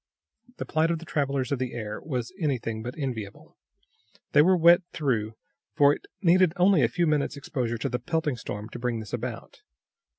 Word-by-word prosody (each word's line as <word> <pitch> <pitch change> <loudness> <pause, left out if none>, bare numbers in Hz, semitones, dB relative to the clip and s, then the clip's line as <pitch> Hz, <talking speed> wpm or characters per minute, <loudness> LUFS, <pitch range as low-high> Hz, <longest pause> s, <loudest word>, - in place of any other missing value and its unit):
The - - -4
plight 160 +1 +1
of 170 - 0
the 170 - -10
travelers 140 -4 -1
of 140 - 0
the 130 -1 -3
air 105 -2 -5
was 130 0 -4
anything 120 -8 -2
but 125 +6 -6
enviable. 120 -9 -6 0.8
They - - +6
were 185 +4 +4
wet 170 +1 +6
through, 115 -7 -1 0.4
for 145 -2 +6
it - - -9 0.2
needed 180 -1 +5
only 180 -2 +4
a 120 - +4
few 175 +7 0
minutes 150 -2 0
exposure 125 -5 -3
to 135 - -2
the 125 0 -2
pelting 160 -6 -1
storm 105 -1 -6
to 120 - -8
bring 120 -1 -1
this 110 -3 -9
about. - - -6
140 Hz, 190 wpm, -26 LUFS, 120-160 Hz, 0.8 s, They